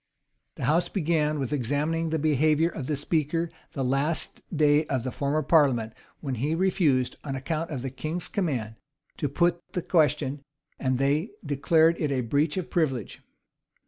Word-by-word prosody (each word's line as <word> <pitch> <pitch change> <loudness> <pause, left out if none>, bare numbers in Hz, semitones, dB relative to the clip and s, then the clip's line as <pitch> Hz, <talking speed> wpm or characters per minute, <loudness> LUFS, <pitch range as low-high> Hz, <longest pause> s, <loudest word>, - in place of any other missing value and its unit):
[*] - - -51
The - - -7
house 170 +5 +2
began 155 -4 +1
with 135 -1 -2
examining 150 +5 0
the 160 - 0
behavior 155 +2 +3
of 145 -6 -6
the 150 - 0
speaker 160 +3 0 0.2
the 135 - -2
last 140 +5 -1
day 150 -2 +3
of 130 -5 -1
the 130 - -3
former 145 +4 -1
parliament; 135 -8 +3 0.3
when 135 -3 -3
he 150 +4 +1
refused, 165 -8 +1
on 135 -2 -4
account 155 +5 -3
of 135 -5 -4
the 135 - -3
king's 155 +6 -4
command, 125 - -2 0.4
to 145 - -1
put 170 +4 +1
the 180 - -2
question: 150 -4 +1 0.4
and 130 -1 0
they 145 - +1 0.2
declared 160 +3 +3
it 150 -3 0
a 130 -2 +1
breach 145 +7 0
of 185 - -4
privilege. 135 - -1
150 Hz, 170 wpm, -27 LUFS, 135-165 Hz, 0.4 s, behavior